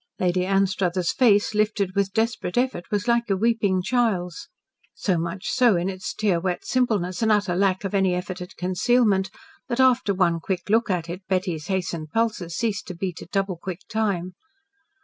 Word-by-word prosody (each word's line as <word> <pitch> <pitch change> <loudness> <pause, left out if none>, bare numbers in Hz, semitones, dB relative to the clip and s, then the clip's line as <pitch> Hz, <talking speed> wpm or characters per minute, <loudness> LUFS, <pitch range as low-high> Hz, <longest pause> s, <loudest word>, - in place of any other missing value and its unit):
Lady 180 0 +1
Anstruthers' 190 -3 +1
face, 210 -5 +3
lifted 210 -3 0
with 200 -1 0
desperate 220 -3 -1
effort, 245 -8 0
was 205 +2 -1
like 235 -1 +2
a 195 - +2
weeping 205 -4 +1
child's. 210 -7 -1 0.5
So 185 -4 0
much 170 +3 -3
so 245 -5 +4
in 175 +2 0
its 185 -1 -5
tear 200 -5 +1
wet 180 0 -3
simpleness 210 -8 0
and 220 -1 +3
utter 205 -4 +2
lack 190 +1 +1
of 195 - -3
any 190 -2 +2
effort 180 +1 -5
at 180 - -8
concealment, 190 +1 +2 0.4
that 245 -1 -2
after 255 -5 +4
one 175 -3 +2
quick 185 +3 -3
look 230 0 +3
at 175 -3 -1
it 175 +3 -6
Betty's 180 -5 -1
hastened 170 -5 -2
pulses 215 -5 -1
ceased 215 -3 -2
to 180 - -6
beat 180 -1 -4
at - - -11
double 195 -2 -1
quick 185 +2 -6
time. 200 -5 -1
195 Hz, 180 wpm, -24 LUFS, 180-215 Hz, 0.5 s, so